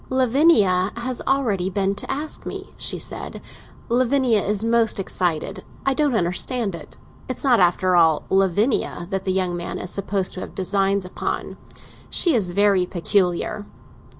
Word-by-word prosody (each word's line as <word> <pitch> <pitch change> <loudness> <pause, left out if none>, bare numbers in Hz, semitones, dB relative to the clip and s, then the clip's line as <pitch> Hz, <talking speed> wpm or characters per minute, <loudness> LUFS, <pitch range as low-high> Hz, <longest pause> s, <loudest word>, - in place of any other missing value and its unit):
"Lavinia 245 - +3
has 245 +1 -3
already 215 -9 +1
been 195 0 0
to - - -8
ask 295 +3 -4
me," - - -7
she - - 0
said. - - -3 0.5
"Lavinia 245 -2 +2
is 210 +1 -1
most 230 -2 +2
excited; 175 -4 -2 0.2
I 270 - +3
don't 285 -2 +1
understand 200 +4 0
it. 170 - -10 0.3
It's 255 - -4
not, 255 -4 +4
after 180 0 +3
all, 160 -3 +4
Lavinia 195 0 +1
that 195 0 -2
the 190 - +1
young 185 -2 0
man 175 0 -5
is 180 - -5
supposed 195 -1 -2
to - - -6
have - - -8
designs 195 0 0
upon. 180 - -4 0.5
She 345 - +3
is 205 -7 +1
very 195 0 +2
peculiar." 185 +3 0
200 Hz, 150 wpm, -22 LUFS, 185-240 Hz, 0.5 s, not